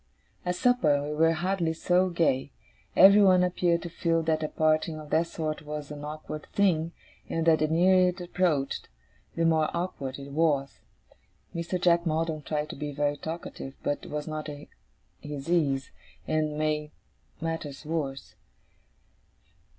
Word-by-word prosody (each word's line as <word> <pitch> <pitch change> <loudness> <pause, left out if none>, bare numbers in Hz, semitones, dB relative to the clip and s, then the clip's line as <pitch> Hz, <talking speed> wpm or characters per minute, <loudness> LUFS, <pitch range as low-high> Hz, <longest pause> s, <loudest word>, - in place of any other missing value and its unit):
At 180 0 -1
supper, 160 - +3
we 150 +1 -3
were 165 +2 +4
hardly 175 0 0
so 180 +3 +2
gay. 145 -6 +1 0.4
Everyone 195 -1 +7
appeared 175 -1 +1
to 175 - -5
feel 165 -1 0
that 160 -1 +1
a 155 - -1
parting 155 +1 +1
of 150 -1 -11
that 165 +2 +2
sort 155 -2 -3
was 150 -1 -6
an 145 0 -7
awkward 155 0 -7
thing, 170 -5 +2 0.4
and 165 0 -1
that 160 -1 +5
the 155 - +2
nearer 180 +3 +4
it 180 +1 -6
approached, 175 -6 -1 0.5
the 165 - +1
more 160 -1 +3
awkward 140 -7 -4
it 140 0 -9
was. 145 -3 +1 0.7
Mr. 170 +2 -2
Jack 170 -1 +3
Maldon 160 0 -1
tried 150 +1 -3
to - - -8
be 150 +1 -4
very 145 0 0
talkative, 160 -3 -7
but 145 - -2
was 150 0 -4
not 155 -1 -4
at 145 0 -9 0.5
his 145 +1 -6
ease, 140 -6 +1 0.4
and 155 -1 0
made 150 -1 -1 0.5
matters 160 -3 -4
worse. 150 -4 -3
155 Hz, 150 wpm, -28 LUFS, 150-170 Hz, 0.7 s, Everyone